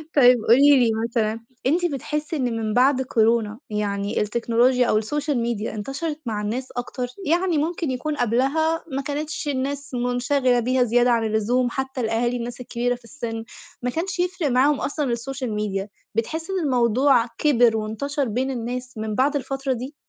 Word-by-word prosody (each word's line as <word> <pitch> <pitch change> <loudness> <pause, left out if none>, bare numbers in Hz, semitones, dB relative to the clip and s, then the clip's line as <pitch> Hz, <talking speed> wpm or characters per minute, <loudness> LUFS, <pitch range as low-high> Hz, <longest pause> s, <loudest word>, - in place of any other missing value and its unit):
طيب 250 -3 +7
قولي 280 +3 +7
لي 235 -2 +3 0.2
مثلًا، 225 -1 0 0.3
أنتِ 340 +6 +2
بتحسّي 300 +1 -3
إن 250 -5 -1
من 215 -1 -2
بعد 260 +2 +4
كورونا 225 -3 +1
يعني 205 -1 -1
التكنولوجيا 235 +3 +2
أو 215 - +3
السوشيال 290 +6 -1
ميديا، 230 -2 -2
انتشرت 270 +8 -4
مع 215 -3 -2
الناس 235 +5 -3
أكتر؟ 245 +1 -3 0.2
يعني 345 +1 +2
ممكن 320 -1 -1
يكون 295 +4 -2
قبلها 275 +7 +1
ما 270 +1 -1
كانتش 295 +2 -4
الناس 280 0 -3
مُنشغلة 245 +1 +1
بيها 250 +2 +2
زيادة 245 +1 +3
عن 230 -1 +2
اللزوم، 225 +3 +1
حتّى 265 +1 -3
الأهالي، 235 +2 0
الناس 240 +1 -6
الكبيرة 245 0 -1
في 245 - -17
السِن، 230 -3 -5 0.4
ما 250 - -1
كانش 340 +7 -3
يفرق 355 -2 0
معاهم 270 +3 +3
أصلًا 295 +1 -1
السوشيال 255 0 -3
ميديا، 205 -1 -2 0.3
بتحسّي 320 - -2
إن 365 -4 -1
الموضوع 250 0 +3
كِبِر 240 -6 +4
وانتشر 275 +7 -2
بين 255 +5 -1
الناس 250 0 -5
من 215 -1 -3
بعد 275 +5 +2
الفترة 270 0 -2
دي؟ 255 +4 -6
250 Hz, 165 wpm, -23 LUFS, 230-285 Hz, 0.4 s, طيب